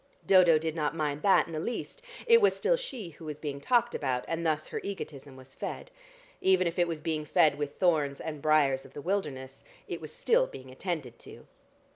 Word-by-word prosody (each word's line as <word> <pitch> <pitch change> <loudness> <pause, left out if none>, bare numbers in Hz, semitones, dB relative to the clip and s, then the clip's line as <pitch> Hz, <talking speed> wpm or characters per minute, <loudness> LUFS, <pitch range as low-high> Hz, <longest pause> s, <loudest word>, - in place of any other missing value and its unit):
Dodo 180 -4 +6
did 160 0 -2
not 155 0 -1
mind 150 -2 -2
that 195 - +5
in 165 - -10
the 155 - -2
least; 240 - -5 0.2
it 465 -1 +6
was 415 - +4
still - - +2
she 260 - -6
who 160 0 -13
was 150 -2 -5
being 140 -2 -5
talked 240 - +2
about, 130 -3 -1
and 165 0 -2
thus 155 -2 0
her - - -4
egotism 145 -8 -7
was 130 0 -14
fed. - - -6 0.5
Even 185 -1 +4
if 170 +1 -2
it 175 - +3
was 165 -2 -4
being 155 -1 -2
fed 150 0 +3
with 145 -1 -3
'thorns 150 -6 +2
and 150 -2 -6
briars 140 -3 +3
of 135 -1 -15
the 145 - -7
wilderness,' 145 -9 -3 0.2
it - - -5
was - - -7
still - - +2
being 130 0 -11
attended 140 -5 -5
to. - - -13
155 Hz, 210 wpm, -29 LUFS, 145-185 Hz, 0.5 s, Dodo